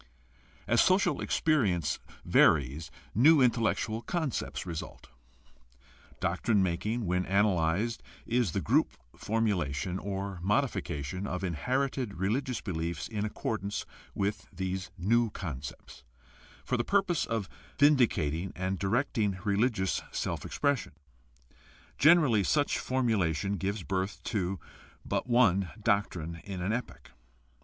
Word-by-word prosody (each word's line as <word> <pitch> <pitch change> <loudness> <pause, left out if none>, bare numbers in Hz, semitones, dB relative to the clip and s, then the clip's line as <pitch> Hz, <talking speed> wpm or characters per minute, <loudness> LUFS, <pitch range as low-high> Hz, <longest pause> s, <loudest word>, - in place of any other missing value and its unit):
As 120 - +4
social 185 +2 +3
experience 100 - +1 0.3
varies 75 +2 +3 0.2
new 150 - +6
intellectual 115 -2 +1
con 155 +4 -1
cepts - - -4
result. 85 -3 -7 1.1
Doctrine 105 -4 +1
making, 105 +6 -1
when 90 +1 +1
analyzed, 100 +2 +1 0.2
is 120 -8 +1
the - - 0
group - - +2 0.2
formulation 95 -6 -1
or 100 -2 -4
modification 95 - -1
of 90 +1 -3
inherited 125 - -1
religious 115 +7 -1
beliefs 85 -4 -3
in 105 -2 -2
accordance 105 -1 -3 0.3
with 100 +1 -2
these 95 0 -3
new 115 +5 +2
concepts, 70 -9 -7 0.6
for 125 - 0
the 120 - +1
purpose 195 -2 +1
of 115 -5 -2 0.3
vin 145 +1 +6
dicating 90 - +1
and 95 0 -2
directing 105 -2 0
religious 105 -1 +1
self - - -3
expression. 145 - 0 1.1
Generally 145 - +5
such 145 -1 +2
formulation 100 - 0
gives 100 0 -2
birth 95 +1 -2
to 95 -4 -2 0.5
but - - -2
one 100 -7 +3
doctrine 85 -6 -1
in 95 -2 -6
an 95 +5 -1
epoch. 115 - -6
100 Hz, 115 wpm, -30 LUFS, 90-120 Hz, 1.1 s, new